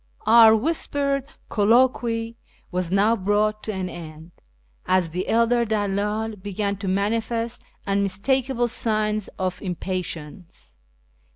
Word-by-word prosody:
Our 225 Hz, 0 st, +8 dB
whispered 280 Hz, +1 st, -1 dB, 0.2 s
colloquy 230 Hz, +1 st, +2 dB, 0.4 s
was 180 Hz, -2 st, -1 dB
now 200 Hz, +4 st, +3 dB
brought 210 Hz, +1 st, 0 dB
to 220 Hz, -, -2 dB
an 190 Hz, -2 st, -3 dB
end, 160 Hz, -1 st, -10 dB, 0.6 s
as 185 Hz, -2 st, +2 dB
the 180 Hz, +3 st, -3 dB
elder 235 Hz, +1 st, +3 dB
dalldl 210 Hz, 0 st, -1 dB
began 200 Hz, +1 st, -2 dB
to 200 Hz, 0 st, -5 dB
manifest 225 Hz, +4 st, -1 dB, 0.2 s
unmistakable 235 Hz, +6 st, 0 dB
signs 215 Hz, -2 st, 0 dB
of 185 Hz, -1 st, -3 dB
impatience. 175 Hz, -, -6 dB
210 Hz, 105 wpm, -23 LUFS, 185-230 Hz, 0.6 s, Our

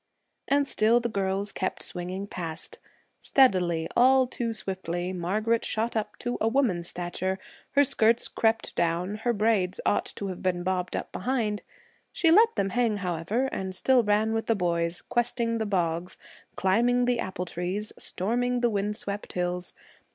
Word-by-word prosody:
And 285 Hz, 0 st, +2 dB
still 225 Hz, +1 st, +3 dB
the 235 Hz, 0 st, -2 dB
girls 200 Hz, -1 st, -1 dB
kept 185 Hz, -, -3 dB
swinging 180 Hz, +2 st, -5 dB
past. 175 Hz, -, -6 dB, 0.4 s
Steadily, 180 Hz, -11 st, +3 dB
all 260 Hz, +1 st, +6 dB
too 240 Hz, -2 st, -3 dB
swiftly, 185 Hz, -4 st, -3 dB
Margaret 215 Hz, +6 st, 0 dB
shot 225 Hz, +2 st, -1 dB
up 210 Hz, -1 st, -2 dB
to 245 Hz, 0 st, -3 dB
a 220 Hz, -, +3 dB
woman's 225 Hz, -9 st, +1 dB
stature; 180 Hz, +2 st, -3 dB, 0.4 s
her 285 Hz, -, +6 dB
skirts 230 Hz, -3 st, +2 dB
crept 225 Hz, 0 st, 0 dB
down, 175 Hz, +4 st, 0 dB
her 240 Hz, +2 st, 0 dB
braids 210 Hz, -4 st, +1 dB
ought -, -, +2 dB
to 200 Hz, -, -4 dB
have 185 Hz, -, -6 dB
been 180 Hz, -1 st, 0 dB
bobbed 180 Hz, -1 st, -1 dB
up -, -, -4 dB
behind. 215 Hz, -2 st, -1 dB, 0.5 s
She 330 Hz, -, +3 dB
let 450 Hz, +6 st, +6 dB
them 195 Hz, -, 0 dB
hang, 235 Hz, -4 st, +1 dB
however, 185 Hz, +6 st, -1 dB
and 190 Hz, -1 st, -4 dB
still 255 Hz, +5 st, +4 dB
ran 215 Hz, +1 st, +2 dB
with 225 Hz, 0 st, -2 dB
the 225 Hz, -, +3 dB
boys, 170 Hz, -2 st, -1 dB
questing 235 Hz, -1 st, 0 dB
the 220 Hz, -, -1 dB
bogs, 175 Hz, -2 st, -1 dB, 0.4 s
climbing 240 Hz, +6 st, +3 dB
the 245 Hz, -1 st, +1 dB
apple 185 Hz, -3 st, -3 dB
trees, 180 Hz, +5 st, -4 dB
storming 245 Hz, +5 st, 0 dB
the 240 Hz, -1 st, +2 dB
wind 205 Hz, 0 st, -1 dB
swept 205 Hz, -1 st, -5 dB
hills. 180 Hz, 0 st, -2 dB
205 Hz, 160 wpm, -27 LUFS, 180-235 Hz, 0.5 s, all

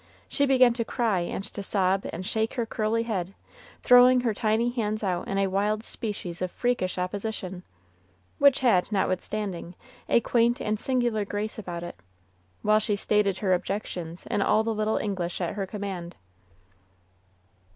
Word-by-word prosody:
She 280 Hz, -, +1 dB
began 255 Hz, -3 st, +5 dB
to 235 Hz, -1 st, -1 dB
cry 225 Hz, -5 st, 0 dB
and 175 Hz, +2 st, -3 dB
to 205 Hz, -, -6 dB
sob 195 Hz, -1 st, +1 dB
and 180 Hz, +3 st, -6 dB
shake 220 Hz, +2 st, -1 dB
her 240 Hz, -3 st, 0 dB
curly 225 Hz, +1 st, 0 dB
head, 195 Hz, -5 st, -3 dB, 0.5 s
throwing 250 Hz, 0 st, +7 dB
her 235 Hz, -3 st, 0 dB
tiny 225 Hz, +3 st, +1 dB
hands 215 Hz, -3 st, -2 dB
out 180 Hz, -3 st, -1 dB
in 195 Hz, -, -2 dB
a 195 Hz, -, +3 dB
wild 205 Hz, +3 st, 0 dB
species 195 Hz, -7 st, -5 dB
of 185 Hz, -, -1 dB
freakish 240 Hz, -5 st, -1 dB
opposition, 185 Hz, 0 st, -4 dB, 0.8 s
which 280 Hz, -2 st, +5 dB
had, 225 Hz, -7 st, +3 dB
notwithstanding, 190 Hz, -2 st, -2 dB, 0.3 s
a -, -, +5 dB
quaint 235 Hz, +1 st, +2 dB
and 215 Hz, 0 st, -1 dB
singular 240 Hz, -5 st, 0 dB
grace 205 Hz, +2 st, -4 dB
about 175 Hz, -4 st, -5 dB
it, 175 Hz, -, -8 dB, 0.6 s
while 215 Hz, 0 st, +4 dB
she 215 Hz, -1 st, 0 dB
stated 200 Hz, -1 st, +1 dB
her 190 Hz, -2 st, +1 dB
objections 180 Hz, -3 st, -4 dB
in 205 Hz, -, -1 dB
all 215 Hz, +2 st, +3 dB
the 225 Hz, 0 st, -1 dB
little 215 Hz, 0 st, 0 dB
English 185 Hz, -4 st, -2 dB
at 175 Hz, -2 st, -2 dB
her 195 Hz, -2 st, -3 dB
command. 190 Hz, -4 st, -5 dB
210 Hz, 160 wpm, -27 LUFS, 185-230 Hz, 0.8 s, throwing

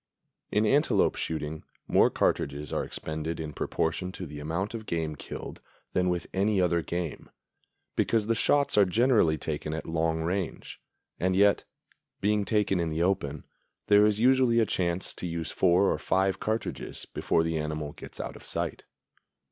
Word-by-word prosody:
In 105 Hz, +1 st, +2 dB
antelope 125 Hz, -4 st, +3 dB
shooting 80 Hz, -1 st, -4 dB, 0.2 s
more -, -, +5 dB
cartridges 70 Hz, +1 st, -1 dB
are -, -, 0 dB
expended 80 Hz, +1 st, -4 dB
in 75 Hz, -2 st, -5 dB
proportion 90 Hz, +3 st, -1 dB
to 90 Hz, -, -6 dB
the 75 Hz, -1 st, -8 dB
amount 85 Hz, +8 st, -3 dB
of 110 Hz, -2 st, -6 dB
game 80 Hz, -2 st, -2 dB
killed -, -, -8 dB, 0.3 s
than 90 Hz, 0 st, +2 dB
with 90 Hz, -1 st, -1 dB
any 100 Hz, +1 st, +2 dB
other 85 Hz, -2 st, +2 dB
game, 85 Hz, -2 st, -4 dB, 0.7 s
because 110 Hz, -2 st, +2 dB
the 115 Hz, -, +2 dB
shots 140 Hz, 0 st, +3 dB
are 100 Hz, -, +7 dB
generally 105 Hz, -5 st, +3 dB
taken 75 Hz, +1 st, -3 dB
at 80 Hz, -, -5 dB
long 80 Hz, 0 st, 0 dB
range; 90 Hz, +1 st, -3 dB, 0.4 s
and 95 Hz, +1 st, +1 dB
yet, 100 Hz, +1 st, +4 dB, 0.5 s
being 105 Hz, 0 st, +1 dB
taken 105 Hz, -4 st, +1 dB
in 85 Hz, -1 st, 0 dB
the 80 Hz, +2 st, 0 dB
open, 75 Hz, -6 st, -1 dB, 0.4 s
there 105 Hz, 0 st, +7 dB
is 105 Hz, 0 st, +1 dB
usually 130 Hz, -1 st, +4 dB
a 115 Hz, -, +4 dB
chance 90 Hz, -2 st, -1 dB
to 90 Hz, -, -5 dB
use 85 Hz, -1 st, -3 dB
four 95 Hz, +2 st, +3 dB
or -, -, -4 dB
five 95 Hz, 0 st, +1 dB
cartridges 110 Hz, +1 st, -3 dB
before 80 Hz, -, 0 dB
the 80 Hz, -1 st, -1 dB
animal 75 Hz, -1 st, -3 dB
gets -, -, -11 dB
out -, -, -5 dB
of -, -, -12 dB
sight. -, -, -3 dB
90 Hz, 165 wpm, -28 LUFS, 80-105 Hz, 0.7 s, are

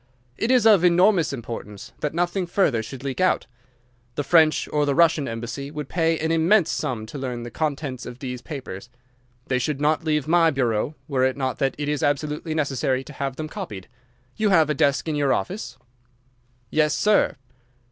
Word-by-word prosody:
It 225 Hz, -, -2 dB
is 250 Hz, -3 st, +4 dB
of 205 Hz, -6 st, +6 dB
enormous 180 Hz, 0 st, +4 dB
importance 115 Hz, -4 st, -7 dB
that 150 Hz, +1 st, -3 dB
nothing 175 Hz, +1 st, 0 dB
further 155 Hz, -, +1 dB
should 130 Hz, +4 st, -9 dB
leak 140 Hz, +5 st, -3 dB
out. 185 Hz, -, +2 dB, 0.7 s
The 145 Hz, -, -1 dB
French 160 Hz, +1 st, +4 dB
or 150 Hz, -1 st, +1 dB
the 140 Hz, -, +1 dB
Russian 160 Hz, -4 st, +3 dB
embassy 115 Hz, +4 st, -5 dB
would 150 Hz, -2 st, -6 dB
pay 165 Hz, -1 st, +1 dB
an 160 Hz, +1 st, -1 dB
immense 165 Hz, +2 st, +3 dB
sum 110 Hz, -4 st, -3 dB
to 135 Hz, +6 st, -8 dB
learn 125 Hz, -3 st, -4 dB
the 120 Hz, -, -7 dB
contents 140 Hz, -3 st, -3 dB
of 120 Hz, -, -8 dB
these 125 Hz, -2 st, -6 dB
papers. 120 Hz, -8 st, -8 dB, 0.6 s
They 130 Hz, -, 0 dB
should 140 Hz, +2 st, -2 dB
not 155 Hz, +3 st, +1 dB
leave 150 Hz, -3 st, 0 dB
my 165 Hz, 0 st, +4 dB
bureau 130 Hz, 0 st, 0 dB
were 135 Hz, -3 st, 0 dB
it 130 Hz, +1 st, +1 dB
not 130 Hz, -2 st, -2 dB
that 135 Hz, -1 st, 0 dB
it 145 Hz, 0 st, -3 dB
is 150 Hz, -1 st, -1 dB
absolutely 150 Hz, +2 st, -1 dB
necessary 135 Hz, -3 st, 0 dB
to 150 Hz, -, -11 dB
have 135 Hz, -1 st, -3 dB
them 155 Hz, +2 st, -5 dB
copied. 100 Hz, -10 st, -7 dB, 0.5 s
You 215 Hz, -1 st, +1 dB
have 160 Hz, -5 st, +4 dB
a -, -, +2 dB
desk 140 Hz, +2 st, +1 dB
in 155 Hz, -, -1 dB
your 145 Hz, -2 st, +2 dB
office?' 180 Hz, -, -4 dB, 0.9 s
"'Yes, 155 Hz, -1 st, +2 dB
sir. 210 Hz, 0 st, +3 dB
145 Hz, 190 wpm, -23 LUFS, 130-165 Hz, 0.9 s, of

